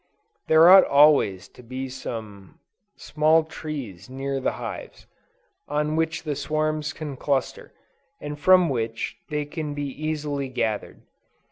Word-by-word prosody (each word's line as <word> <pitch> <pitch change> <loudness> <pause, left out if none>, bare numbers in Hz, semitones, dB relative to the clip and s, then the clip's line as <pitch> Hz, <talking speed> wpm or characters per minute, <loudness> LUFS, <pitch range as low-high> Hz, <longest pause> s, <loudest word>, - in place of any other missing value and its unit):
There 160 +1 +7
ought 190 +1 +9
always 140 -10 +4
to - - -16
be 130 +2 -6
some 110 -7 -8 0.4
small 155 +1 +2
trees 140 - -7
near 135 +1 -3
the - - -1
hives, - - -8 0.6
on 150 +1 -1
which 160 0 -1
the 150 -3 -3
swarms 155 +1 -1
can 150 -2 -7
cluster, 135 0 -2 0.5
and 145 0 -7
from 185 +3 +5
which 115 -5 -3
they 150 -1 -2
can 150 -1 -5
be 145 - -3
easily 145 -1 -3
gathered. 110 -4 -3
145 Hz, 130 wpm, -24 LUFS, 130-155 Hz, 0.6 s, ought